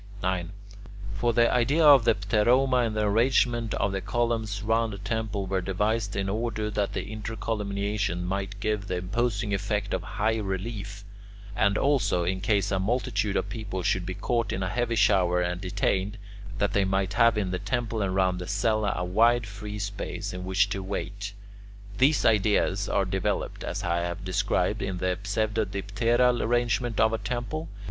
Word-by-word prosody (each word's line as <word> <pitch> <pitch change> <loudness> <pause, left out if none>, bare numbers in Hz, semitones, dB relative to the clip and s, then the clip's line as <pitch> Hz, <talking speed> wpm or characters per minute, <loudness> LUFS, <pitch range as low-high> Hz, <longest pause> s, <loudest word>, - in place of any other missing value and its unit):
9. 90 -1 -1 0.6
For 120 +4 +1
the 115 0 +4
idea 140 +7 +3
of 140 -5 +8
the - - +4
pteroma 120 +7 +2
and 110 - -4
the 110 - 0
arrangement 120 +1 +2
of 100 0 0
the 95 0 -2
columns 115 -3 -1
round 115 0 +1
a - - -8
temple 105 0 -3
were 95 0 -1
devised 105 +3 -1
in 95 0 -1
order 110 +1 -2
that 105 -1 -1
the 95 - -2
intercolumniations 105 -3 -2
might 100 +2 -3
give 105 -1 -1
the 90 - -2
imposing 105 +2 -1
effect 105 +1 -1
of - - 0
high 110 +2 -1
relief; 100 0 -4 0.5
and 100 +1 +2
also, 115 -11 +2
in 95 +2 -1
case 100 -1 +1
a 95 - +1
multitude 105 -1 0
of - - -2
people 100 -5 -5
should 95 +1 +1
be 90 +1 -5
caught 115 +2 -1
in 95 - -2
a 95 - -1
heavy 120 +3 -1
shower 95 -4 +3
and 90 0 -1
detained, 95 +2 -1 0.4
that 100 -1 0
they 100 - +3
might 95 0 0
have 115 +2 +4
in 95 -3 -1
the 90 - -2
temple 120 -3 -2
and 95 -2 -1
round 95 -1 +2
the 90 - -6
cella 105 +1 +1
a 90 - -2
wide 115 +6 +3
free 105 0 -7
space 100 -2 -4
in 90 0 -5
which 95 +2 +2
to 95 -1 -3
wait. 100 +1 -5 0.7
These 140 +1 +4
ideas 100 -2 +2
are 100 - +1
developed, 95 0 -2
as - - -4
I 85 0 0
have 85 +2 -3
described, 90 -1 0
in 95 -1 -2
the 90 0 -1
pseudodipteral 110 +3 +1
arrangement 120 0 0
of 110 0 +4
a 115 - -1
temple. 125 +6 -4
105 Hz, 175 wpm, -27 LUFS, 95-115 Hz, 0.7 s, of